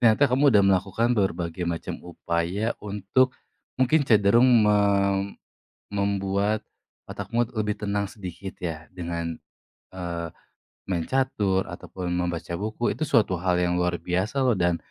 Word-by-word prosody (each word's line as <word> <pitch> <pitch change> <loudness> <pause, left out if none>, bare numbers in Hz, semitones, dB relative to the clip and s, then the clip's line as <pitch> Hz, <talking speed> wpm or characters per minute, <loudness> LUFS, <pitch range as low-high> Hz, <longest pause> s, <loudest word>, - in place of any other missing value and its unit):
ternyata 120 +4 +5
kamu 140 +2 +4
udah 105 -5 +5
melakukan 100 +5 +2
berbagai 85 -4 -1
macam 85 -1 -4
upaya 90 +5 -2
untuk 105 +6 +1 0.4
mungkin 130 +5 +3
cenderung 110 +3 +5 0.2
me 105 0 +4 1.2
membuat 100 +1 0 0.4
otakmu, 120 +1 -2
eee, 115 - -9
lebih 105 -1 0
tenang 100 0 0
sedikit 95 -2 -8
ya, 80 -2 -4
dengan, 85 -2 -3 0.5
eee 85 -2 -5 0.6
main 90 -3 -1
catur, 105 -8 +1
ataupun 90 0 -6
membaca 90 -1 -2
buku. 110 +6 -1
Itu - - -15
suatu 115 -8 +3
hal 90 0 +1
yang 90 0 +1
luar 90 0 0
biasa 100 +12 -1
loh, 125 - +4
dan 85 -1 +1
95 Hz, 135 wpm, -25 LUFS, 90-110 Hz, 1.2 s, ternyata